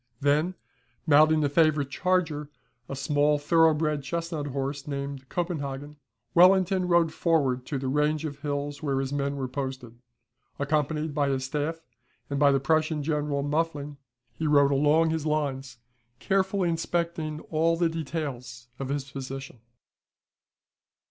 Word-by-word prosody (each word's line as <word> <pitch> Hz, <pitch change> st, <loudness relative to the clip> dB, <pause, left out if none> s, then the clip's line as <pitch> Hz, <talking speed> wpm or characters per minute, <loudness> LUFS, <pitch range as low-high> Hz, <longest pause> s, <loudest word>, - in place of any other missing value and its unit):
Then, 150 Hz, +6 st, +1 dB, 0.5 s
mounting 155 Hz, 0 st, +5 dB
a -, -, +3 dB
favourite 150 Hz, -2 st, +2 dB
charger, 165 Hz, -5 st, 0 dB, 0.4 s
a 140 Hz, -, -4 dB
small 145 Hz, +2 st, +2 dB
thorough 160 Hz, +2 st, +4 dB
bred 150 Hz, -1 st, 0 dB
chestnut 165 Hz, 0 st, -3 dB
horse, 140 Hz, +1 st, -4 dB
named 140 Hz, -2 st, -5 dB
"Copenhagen," 150 Hz, -4 st, -4 dB, 0.4 s
Wellington 185 Hz, +1 st, +5 dB
rode 170 Hz, -2 st, +3 dB
forward 135 Hz, -7 st, +1 dB
to 145 Hz, -, -2 dB
the 135 Hz, 0 st, -3 dB
range 150 Hz, +3 st, +1 dB
of 145 Hz, -2 st, -6 dB
hills 145 Hz, 0 st, -3 dB
where 140 Hz, -3 st, 0 dB
his 135 Hz, +1 st, -3 dB
men 140 Hz, 0 st, -1 dB
were 135 Hz, -2 st, -3 dB
posted. 130 Hz, -3 st, -6 dB, 0.6 s
Accompanied 150 Hz, +1 st, -1 dB
by 145 Hz, -1 st, +1 dB
his 130 Hz, -1 st, -1 dB
staff 150 Hz, +4 st, -3 dB, 0.5 s
and 140 Hz, -, -1 dB
by 145 Hz, -1 st, +5 dB
the 135 Hz, -, +3 dB
Prussian 155 Hz, +2 st, +1 dB
General 145 Hz, -2 st, -1 dB
Muffling, 145 Hz, -1 st, -2 dB, 0.4 s
he 160 Hz, -, -3 dB
rode 145 Hz, -1 st, +5 dB
along 150 Hz, +4 st, +3 dB
his 160 Hz, -1 st, -2 dB
lines, 140 Hz, -4 st, -2 dB, 0.4 s
carefully 190 Hz, -, +1 dB
inspecting 165 Hz, -2 st, -2 dB
all 165 Hz, +1 st, +2 dB
the 170 Hz, 0 st, +2 dB
details 135 Hz, -7 st, -5 dB
of 135 Hz, -1 st, -4 dB
his 140 Hz, 0 st, -1 dB
position. 135 Hz, -2 st, -7 dB
150 Hz, 140 wpm, -27 LUFS, 140-160 Hz, 0.6 s, mounting